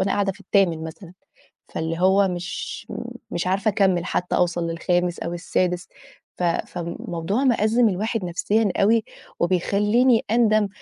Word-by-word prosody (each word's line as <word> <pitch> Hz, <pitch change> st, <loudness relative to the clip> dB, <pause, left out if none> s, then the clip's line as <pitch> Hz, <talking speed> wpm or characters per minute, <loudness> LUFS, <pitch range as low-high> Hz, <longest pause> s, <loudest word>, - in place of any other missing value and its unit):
وأنا 195 Hz, +1 st, +1 dB
قاعدة 200 Hz, -1 st, +1 dB
في 200 Hz, -, -19 dB
التامن 175 Hz, -6 st, +1 dB
مثلًا، 170 Hz, +2 st, -9 dB, 0.6 s
فاللي 165 Hz, +1 st, -3 dB
هو 195 Hz, +2 st, +4 dB
مش 180 Hz, -1 st, -5 dB, 0.4 s
مش 175 Hz, +1 st, -2 dB
عارفة 200 Hz, +4 st, +1 dB
أكمّل 190 Hz, -3 st, +2 dB
حتّى 180 Hz, -, -1 dB
أوصل 175 Hz, -1 st, +1 dB
للخامس 175 Hz, +1 st, 0 dB
أو 170 Hz, -, -4 dB
السادس، 180 Hz, +1 st, -1 dB, 0.5 s
ف 180 Hz, -, -3 dB
فالموضوع 170 Hz, +5 st, -2 dB
مأزِّم 230 Hz, -1 st, +3 dB
الواحد 210 Hz, +2 st, -2 dB
نَفْسيًا 200 Hz, +4 st, +1 dB
أوي 220 Hz, +2 st, +3 dB, 0.4 s
وبيخلّيني 210 Hz, +7 st, +2 dB
أندم 215 Hz, -3 st, +3 dB
190 Hz, 135 wpm, -23 LUFS, 175-210 Hz, 0.6 s, هو